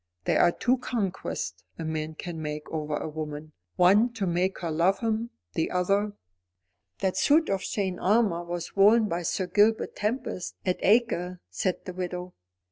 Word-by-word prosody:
There - - +2
are - - +5
two 250 +7 +1
conquests 205 -7 -3
a 165 - -5
man 155 0 -3
can 165 0 -6
make 150 0 -4
over 150 -2 -2
a - - -4
woman, 155 0 -6 0.2
one 205 +7 +5
to 215 -5 -2
make 180 +2 0
her 170 -2 -2
love 170 +5 +3
him, 225 0 -1 0.2
the 160 - 0
other 200 +3 +1 0.4
" 95 +1 -52
"That 185 -1 0
suit 310 +9 +4
of 195 -1 0
chain 190 -3 -2
armour 200 -4 +2
was 175 0 -5
worn 215 +3 +6
by 175 -2 -2
Sir 175 +3 -1
Gilbert 210 +5 +2
Tempest 215 -3 -3
at 185 -1 0
Acre," 185 -5 +2
said 180 - -2
the 185 - -5
widow. 180 0 -5
180 Hz, 170 wpm, -27 LUFS, 165-210 Hz, 0.4 s, worn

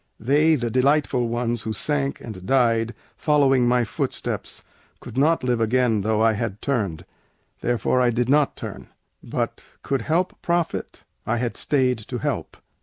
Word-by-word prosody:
They, 150 +7 +3
the 120 -4 -2
delightful 130 -1 +2
ones, 120 0 -1
who 110 0 -3
sank 140 +5 -1
and 105 -6 -8
died, 115 0 +2 0.2
Following 135 -4 +3
my 125 0 +3
footsteps, 110 - -4 0.4
could 120 - -10
not 150 +4 +3
live 120 -2 +1
again 115 -1 +2
Though 110 +1 +1
I 115 0 +4
had 105 -2 -3
turned, 105 - -2 0.5
therefore 120 +1 +1
I 125 - +4
did 120 0 0
not 145 +1 +3
turn; - - -7 0.3
But - - -3 0.2
could 135 -2 -1
help 170 +8 -1
profit, 170 -1 -2 0.2
I 120 - +1
had 120 0 -2
stayed 130 -4 +1
to 115 +3 -6
help. - - -3
125 Hz, 155 wpm, -23 LUFS, 115-140 Hz, 0.5 s, I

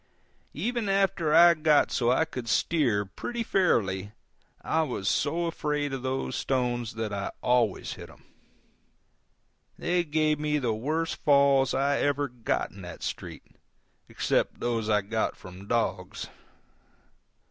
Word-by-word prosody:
Even 225 +5 -2
after 195 -5 +1
I 170 +2 +8
got 155 -2 +3
so 120 -1 +1
I 130 +5 +3
could 125 -7 -7
steer 115 -4 +1
pretty 235 - -5
fairly 105 - +1 0.5
I 160 - +1
was 125 -10 -3
so 165 +9 +1
afraid 150 -3 -2
of 135 - -3
those 130 +1 -2
stones 120 -4 -1
that 110 -2 -3
I 100 -1 -3
always 120 -5 +1
hit - - -10
them. - - -18 1.5
They 175 0 +1
gave 155 -1 +1
me 150 0 0
the 125 -6 0
worst 155 +9 -2
falls 140 -2 +4
I 140 +1 +1
ever 145 0 +1
got 120 -3 -2
in 100 - -12
that 90 -2 -9
street, - - -5 0.7
except - - 0
those 115 -2 -1
which 110 - +2
I 105 - +2
got 110 +3 -1
from 90 +2 -12
dogs. 115 +1 -2
135 Hz, 140 wpm, -27 LUFS, 115-155 Hz, 1.5 s, I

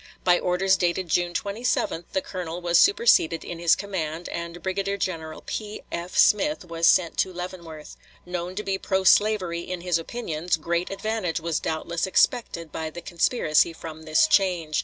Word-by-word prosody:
By 180 -1 +4
orders 190 +2 +2
dated 175 0 -1
June 175 +1 0
27 200 -5 -1
the 190 - -1
colonel 175 -2 -5
was 175 -1 +3
superseded 400 - +4
in 170 - -6
his 170 -1 +4
command, 175 -4 -4
and 170 0 -6
Brigadier 195 +1 -1
General 160 -5 -4
P.F. 195 -4 -6
Smith 295 +2 +3
was 165 -1 +1
sent 170 -3 +3
to 185 - +1
Leavenworth. 170 -4 -8 0.3
Known 180 0 -4
to 210 - -3
be 195 -1 -2
pro 190 -1 0
slavery 190 -4 +3
in 180 0 -5
his 175 -2 +1
opinions, 170 -4 -2
great 170 +2 -2
advantage 200 -3 -2
was 165 -1 -2
doubtless 165 +2 -2
expected 175 - +1
by 160 0 -4
the 175 +2 -9
conspiracy 170 -3 +2
from 160 -1 -9
this 155 - +3
change. 180 - +1
175 Hz, 160 wpm, -25 LUFS, 165-190 Hz, 0.3 s, By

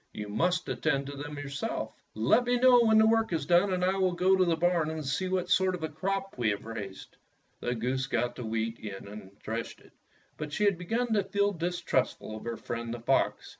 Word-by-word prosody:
You 105 -1 -6
must 180 - 0
attend 140 -3 0
to 140 +1 -7
them 145 +1 -7
yourself. 145 -1 -4 0.2
Let 115 - +3
me 245 +1 +2
know 250 -1 +6
when 220 -1 +5
the 220 - +6
work 225 -1 +3
is 155 -4 -1
done 175 +5 +4
and 180 -1 +1
I 190 +1 +1
will 185 -2 +2
go 185 +2 +3
to 190 - +4
the 170 -2 +2
barn 170 -2 +1
and 160 -2 -4
see 185 +8 -1
what 185 -1 -1
sort 190 0 +3
of 170 - -8
a 160 - -1
crop 195 +1 -3
we 115 -3 +2
have 100 0 -3
raised." 105 -4 -7 0.4
The 120 0 -2
goose 130 +3 -1
got 120 0 -1
the 125 - -6
wheat 115 +1 -2
in 100 -2 -7
and 100 -1 -11
threshed 115 +1 -4
it. - - -20 0.5
But 150 -1 -6
she 210 - 0
had 200 -4 +3
begun 230 +6 -1
to 205 -2 +3
feel 200 +1 +1
distrustful 170 - -1
of 110 - -9
her 115 -1 -3
friend, 115 0 -5
the 120 - -4
fox. 130 +4 +1
160 Hz, 230 wpm, -29 LUFS, 115-190 Hz, 0.5 s, know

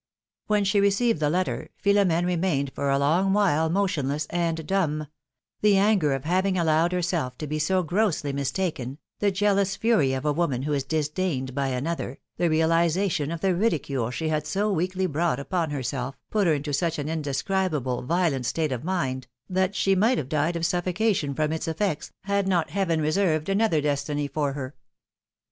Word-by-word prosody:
When 210 -1 +2
she 200 +1 +2
received 200 0 +2
the 150 -1 +1
letter, 180 +3 -1 0.2
Philom^ne 195 -4 +3
remained 170 -6 0
for 140 - -2
a 135 - +3
long 170 +8 +2
while 160 -6 +2
motionless 155 -6 0
and 165 -2 -1
dumb; 155 -5 0 0.6
the 210 -2 +5
anger 195 -8 +3
of 135 -1 -3
having 185 +3 +1
allowed 165 0 +2
herself 170 -8 -1
to 155 - -5
be 155 +1 -3
so 185 +4 +1
grossly 175 -5 0
mistaken, 140 -2 -2 0.2
the 205 - +3
jealous 200 0 +1
fury 215 - +2
of 130 +2 -3
a 150 - +2
woman 140 -6 0
who 150 +1 -1
is 140 -2 0
disdained 150 -2 -1
for 140 +1 -1
another, 135 0 -3 0.2
the 175 - +2
realization 165 0 +2
of 170 -1 -4
the 190 -1 +2
ridicule 150 - 0
she 155 +5 -3
had 150 -1 -1
so 205 +5 0
weakly 185 +2 -1
brought 165 -4 0
upon 165 +2 -1
herself, 135 -1 -3
put 210 -4 +2
her 160 - +4
into 145 0 -4
such 165 +3 0
an 145 -1 -3
indescribable, 155 -3 -1
violent 150 -4 0
state 155 +4 -1
of 125 -1 -3
mind, 135 -8 -2 0.2
that 190 +1 0
she 195 +1 +2
might 220 +7 +3
have 130 - -3
died 155 +3 0
of 170 0 -1
suffocation 180 -3 0
from 155 +1 0
its 160 +1 -3
effects, 165 0 -2
had 200 0 0
not 175 -4 +1
Heaven 175 -5 0
reserved 155 0 +1
another 195 -6 +2
destiny 145 0 -1
for 140 0 -1
her. 135 -1 -5
165 Hz, 180 wpm, -25 LUFS, 145-190 Hz, 0.6 s, the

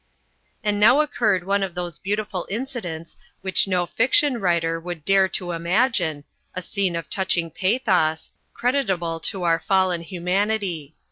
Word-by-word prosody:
And 205 -1 0
now 225 +7 +6
occurred 210 -11 +1
one 200 +2 +1
of 190 -3 -3
those 175 -3 -5
beautiful 205 -2 -3
incidents 195 -8 -5 0.2
which 190 +1 +2
no 180 -2 +1
fiction 255 +6 +2
writer 170 -3 +1
would 170 -2 -7
dare 195 -1 +4
to 180 -1 -2
imagine, 170 - +1 0.3
a 185 - -3
scene 190 -2 -1
of 165 -1 -4
touching 175 -4 0
pathos, 185 -5 +1 0.2
creditable 190 -11 -1
to 185 +3 -3
our 165 -1 +3
fallen 185 -1 +1
humanity. 180 -2 -2
185 Hz, 140 wpm, -23 LUFS, 170-205 Hz, 0.3 s, now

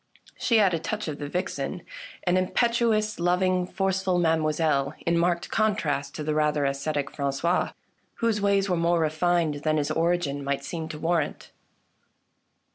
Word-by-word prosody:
She 235 - +2
had 200 -4 +4
a 165 - 0
touch 210 +4 -3
of 150 -2 -4
the 145 - -4
vixen, 180 0 -3 0.4
an 175 0 +2
impetuous, 215 +2 +1
loving, 180 +1 +2
forceful 190 -1 0
mademoiselle, 155 -3 +1
in 170 - +2
marked 170 +1 0
contrast 155 -11 0
to 155 - -4
the 155 0 -1
rather 150 -1 +1
ascetic 140 +1 -1
Frangois, 140 +5 0 0.4
whose 225 -3 0
ways 200 -1 +2
were 180 - +1
more 170 +1 +2
refined 160 0 +1
than 155 0 +1
his 145 0 0
origin 165 -3 0
might 140 0 -2
seem 160 +2 -4
to 155 - -6
warrant. 165 -1 -1
170 Hz, 150 wpm, -26 LUFS, 150-185 Hz, 0.4 s, had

